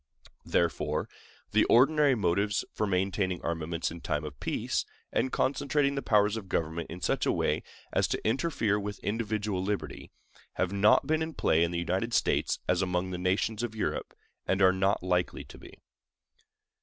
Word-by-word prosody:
Therefore, 85 Hz, -1 st, 0 dB, 0.4 s
the -, -, +4 dB
ordinary 140 Hz, +2 st, +5 dB
motives 100 Hz, 0 st, +1 dB
for 105 Hz, -, -1 dB
maintaining 95 Hz, -1 st, 0 dB
armaments 85 Hz, 0 st, -2 dB
in 85 Hz, 0 st, -9 dB
time 75 Hz, -2 st, -2 dB
of 70 Hz, -3 st, -8 dB
peace, -, -, -1 dB, 0.3 s
and 130 Hz, -, +1 dB
concentrating 140 Hz, +1 st, +1 dB
the 140 Hz, -, -2 dB
powers 105 Hz, -2 st, +3 dB
of 100 Hz, -4 st, -8 dB
government 80 Hz, 0 st, -2 dB
in 90 Hz, +2 st, -8 dB
such -, -, 0 dB
a -, -, +4 dB
way -, -, 0 dB, 0.3 s
as -, -, +2 dB
to -, -, -2 dB
interfere 115 Hz, -5 st, +1 dB
with 100 Hz, 0 st, -5 dB
individual 105 Hz, -3 st, -1 dB
liberty, 100 Hz, +1 st, -4 dB, 0.4 s
have 95 Hz, +1 st, -1 dB
not 105 Hz, +6 st, +4 dB
been 155 Hz, +2 st, +1 dB
in 160 Hz, 0 st, -3 dB
play 80 Hz, -, +3 dB
in 85 Hz, -, +1 dB
the 85 Hz, -, -3 dB
United 95 Hz, +7 st, -1 dB
States -, -, +1 dB
as 90 Hz, 0 st, +2 dB
among 90 Hz, 0 st, -1 dB
the 90 Hz, -, -4 dB
nations 100 Hz, +4 st, 0 dB
of 120 Hz, -2 st, -4 dB
Europe, 110 Hz, -, -3 dB, 0.3 s
and 95 Hz, -, +1 dB
are 95 Hz, -1 st, +6 dB
not 95 Hz, 0 st, +1 dB
likely 90 Hz, -1 st, 0 dB
to -, -, -14 dB
be. -, -, -13 dB
100 Hz, 170 wpm, -29 LUFS, 90-110 Hz, 0.4 s, are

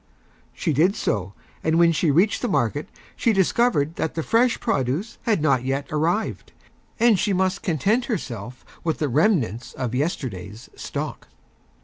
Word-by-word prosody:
She 160 Hz, -, -1 dB
did 175 Hz, +8 st, +3 dB
so, 100 Hz, -2 st, -2 dB, 0.3 s
and 160 Hz, +1 st, +2 dB
when 170 Hz, 0 st, +5 dB
she 165 Hz, 0 st, +1 dB
Reached 180 Hz, +9 st, +3 dB
the 245 Hz, -, 0 dB
Market 145 Hz, -, 0 dB, 0.3 s
she 230 Hz, -, +2 dB
Discovered 190 Hz, -5 st, +2 dB
that 160 Hz, -, -2 dB
the 165 Hz, -, -2 dB
Fresh 235 Hz, +5 st, +2 dB
Produce 170 Hz, -, -1 dB
had 205 Hz, -9 st, +2 dB
not 135 Hz, -5 st, +3 dB
yet 135 Hz, +2 st, -1 dB
Arrived, 165 Hz, +8 st, -1 dB, 0.5 s
and 225 Hz, -4 st, +5 dB
she 200 Hz, -, +1 dB
must 190 Hz, +1 st, 0 dB
Content 205 Hz, -, +1 dB
herself 125 Hz, -, -5 dB, 0.2 s
with 160 Hz, -2 st, 0 dB
the 150 Hz, -, 0 dB
Remnants 130 Hz, -, +1 dB
of 125 Hz, -3 st, -3 dB
Yesterday's 120 Hz, -, -4 dB
Stock. -, -, -5 dB
160 Hz, 150 wpm, -23 LUFS, 130-200 Hz, 0.5 s, when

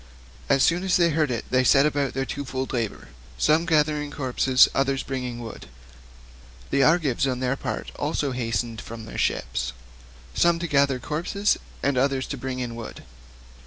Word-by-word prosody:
As 135 Hz, -1 st, +4 dB
soon 175 Hz, +2 st, +2 dB
as 190 Hz, -1 st, +3 dB
they 170 Hz, -2 st, +3 dB
heard 155 Hz, -1 st, +1 dB
it 120 Hz, -2 st, -3 dB
they 130 Hz, 0 st, +3 dB
set 135 Hz, +2 st, +5 dB
about 145 Hz, -3 st, 0 dB
their 135 Hz, 0 st, -1 dB
twofold 135 Hz, -2 st, -4 dB
labour, 115 Hz, -, -3 dB, 0.3 s
some 160 Hz, +3 st, +3 dB
to -, -, -2 dB
gather 150 Hz, -1 st, +3 dB
the 145 Hz, -, -6 dB
corpses, 130 Hz, -2 st, +3 dB
and -, -, 0 dB
others 135 Hz, 0 st, +1 dB
to -, -, -20 dB
bring 135 Hz, -1 st, -3 dB
in 120 Hz, -1 st, -5 dB
wood. 115 Hz, -2 st, -8 dB, 1.0 s
The 140 Hz, -, +3 dB
Argives 145 Hz, -4 st, +3 dB
on 130 Hz, -1 st, -1 dB
their 130 Hz, +1 st, 0 dB
part -, -, -5 dB
also 145 Hz, -1 st, -1 dB
hastened 115 Hz, -2 st, -2 dB
from 115 Hz, -1 st, -9 dB
their -, -, -7 dB
ships, 60 Hz, 0 st, -1 dB, 0.6 s
some 170 Hz, 0 st, +3 dB
to 170 Hz, -, -3 dB
gather 140 Hz, -3 st, +3 dB
the 125 Hz, -, -13 dB
corpses, 180 Hz, +7 st, 0 dB, 0.2 s
and 140 Hz, -2 st, +2 dB
others 135 Hz, 0 st, +1 dB
to -, -, -3 dB
bring 130 Hz, +1 st, -4 dB
in 125 Hz, -2 st, -4 dB
wood. 115 Hz, -1 st, -8 dB
135 Hz, 195 wpm, -25 LUFS, 125-150 Hz, 1.0 s, set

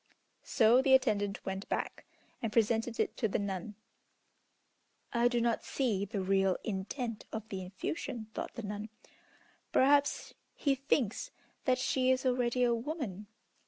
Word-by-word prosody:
So 235 Hz, 0 st, +4 dB
the 265 Hz, -1 st, +6 dB
attendant 205 Hz, -6 st, +1 dB
went 190 Hz, +1 st, -4 dB
back, -, -, -3 dB, 0.4 s
and 225 Hz, -, -2 dB
presented 225 Hz, +1 st, +1 dB
it -, -, 0 dB
to 225 Hz, -, +1 dB
the 200 Hz, -, 0 dB
nun. 200 Hz, +1 st, -4 dB, 1.4 s
"I 235 Hz, 0 st, +4 dB
do 245 Hz, 0 st, +1 dB
not 235 Hz, -1 st, +1 dB
see 215 Hz, -8 st, 0 dB
the 195 Hz, -1 st, -3 dB
real 195 Hz, -1 st, +2 dB
intent 220 Hz, +3 st, -3 dB
of 220 Hz, -1 st, -5 dB
the 190 Hz, -3 st, -4 dB
effusion," 220 Hz, -, -4 dB
thought -, -, -5 dB
the 235 Hz, -, -5 dB
nun. 210 Hz, +1 st, -5 dB, 0.8 s
"Perhaps 285 Hz, +2 st, +3 dB, 0.2 s
he 280 Hz, -, +2 dB
thinks 275 Hz, -, 0 dB, 0.4 s
that 255 Hz, -1 st, +3 dB
she 255 Hz, 0 st, +1 dB
is 260 Hz, 0 st, +2 dB
already 250 Hz, -1 st, +2 dB
a 240 Hz, -1 st, +4 dB
woman. 230 Hz, -, -4 dB
230 Hz, 145 wpm, -32 LUFS, 205-255 Hz, 1.4 s, the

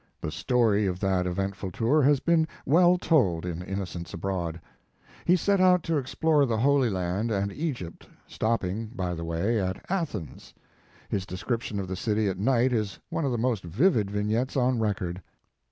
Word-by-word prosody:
The 75 Hz, -, -4 dB
story 110 Hz, -, +2 dB
of 90 Hz, -1 st, -2 dB
that 95 Hz, -2 st, +1 dB
eventful 95 Hz, +1 st, -3 dB
tour 120 Hz, -, +2 dB
has 140 Hz, 0 st, +4 dB
been 165 Hz, 0 st, +2 dB, 0.2 s
well 175 Hz, +4 st, +5 dB
told 105 Hz, -, +2 dB
in 85 Hz, -1 st, -4 dB
"Innocents 90 Hz, -2 st, -5 dB
Abroad." 85 Hz, -2 st, -3 dB, 0.7 s
He 175 Hz, -, +5 dB
set 200 Hz, +1 st, +2 dB
out 180 Hz, -2 st, +5 dB
to 165 Hz, -2 st, 0 dB
explore 145 Hz, +2 st, +2 dB
the 115 Hz, -2 st, 0 dB
Holy 135 Hz, +2 st, +3 dB
L,and 95 Hz, +3 st, -1 dB
and 100 Hz, -2 st, -1 dB
Egypt, 130 Hz, -, -5 dB, 0.2 s
stopping, 110 Hz, -1 st, -1 dB
by 90 Hz, -2 st, -2 dB
the 85 Hz, -1 st, -5 dB
way, 90 Hz, +7 st, 0 dB
at 95 Hz, 0 st, -3 dB
Athens. 140 Hz, -, -4 dB, 0.5 s
His 95 Hz, -1 st, -3 dB
description 105 Hz, +3 st, -3 dB
of 95 Hz, -, -4 dB
the 95 Hz, -, -3 dB
city 105 Hz, +2 st, 0 dB
at 95 Hz, -1 st, -2 dB
night 125 Hz, +3 st, +2 dB
is 105 Hz, -4 st, -1 dB
one 160 Hz, -, -1 dB
of 135 Hz, -, 0 dB
the 120 Hz, -, 0 dB
most 115 Hz, -3 st, 0 dB
vivid 105 Hz, -, +2 dB
vignettes 110 Hz, +7 st, -1 dB
on 125 Hz, -1 st, +2 dB
record. 95 Hz, -4 st, -2 dB
105 Hz, 170 wpm, -27 LUFS, 95-135 Hz, 0.7 s, well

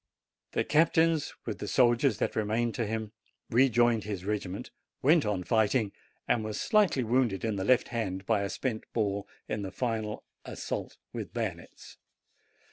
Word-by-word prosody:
The -, -, +1 dB
captain, 165 Hz, +1 st, +4 dB, 0.3 s
with 110 Hz, -, -4 dB
the 105 Hz, -, -4 dB
soldiers 120 Hz, -1 st, +3 dB
that -, -, -1 dB
remained 110 Hz, +2 st, 0 dB
to 115 Hz, -4 st, -2 dB
him, 110 Hz, -1 st, -3 dB, 0.4 s
rejoined 120 Hz, -2 st, +4 dB
his 100 Hz, -3 st, -5 dB
regiment, 100 Hz, -2 st, -3 dB, 0.3 s
went 150 Hz, -3 st, +5 dB
on 100 Hz, -3 st, -1 dB
fighting, 110 Hz, 0 st, +2 dB, 0.4 s
and 115 Hz, -, +2 dB
was 110 Hz, -1 st, -4 dB
slightly 205 Hz, -, +3 dB
wounded 115 Hz, -4 st, +1 dB
in 110 Hz, -2 st, 0 dB
the 95 Hz, -, -2 dB
left 125 Hz, +4 st, +3 dB
hand 95 Hz, -5 st, -3 dB
by 110 Hz, -2 st, +2 dB
a 100 Hz, -, -2 dB
spent 115 Hz, -1 st, -3 dB
ball 100 Hz, -3 st, -1 dB, 0.2 s
in 105 Hz, -, -2 dB
the 95 Hz, -, -4 dB
final 110 Hz, -1 st, -2 dB, 0.2 s
assault -, -, -5 dB, 0.2 s
with -, -, -6 dB
bayonets. -, -, -5 dB
110 Hz, 155 wpm, -29 LUFS, 105-125 Hz, 0.4 s, went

